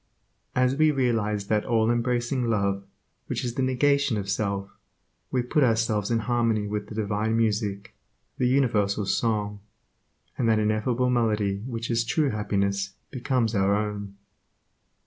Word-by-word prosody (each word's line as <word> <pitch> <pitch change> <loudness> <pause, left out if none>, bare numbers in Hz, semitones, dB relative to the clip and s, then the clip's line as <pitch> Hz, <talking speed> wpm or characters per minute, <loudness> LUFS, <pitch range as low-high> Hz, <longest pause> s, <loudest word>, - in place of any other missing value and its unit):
As 125 +1 +3
we 155 +2 +4
realize 115 -7 0
that 105 +1 +1
all 115 0 +2
embracing 120 +1 0
love 100 -3 0 0.4
which - - -3
is 120 - -2
the 135 - -2
negation 135 -1 +2
of 100 -1 -3
self, 100 -2 -2 0.6
we 125 -1 0
put 145 +4 +2
ourselves 110 -4 +1
in 115 -1 +1
harmony 115 -3 +1
with 105 0 -3
the 105 - -9
divine 110 +1 0
music, 105 -3 -1 0.5
the 125 - +3
universal 110 -6 +2
song, 105 -1 0 0.8
and 115 - +2
that 110 - +4
ineffable 110 +4 +1
melody 105 -5 +1
which 115 -1 -4
is 115 0 +2
true 140 +5 +1
happiness 100 -2 -1 0.2
becomes 125 -3 0
our 100 -1 +2
own. 105 -1 -3
110 Hz, 145 wpm, -26 LUFS, 105-125 Hz, 0.8 s, we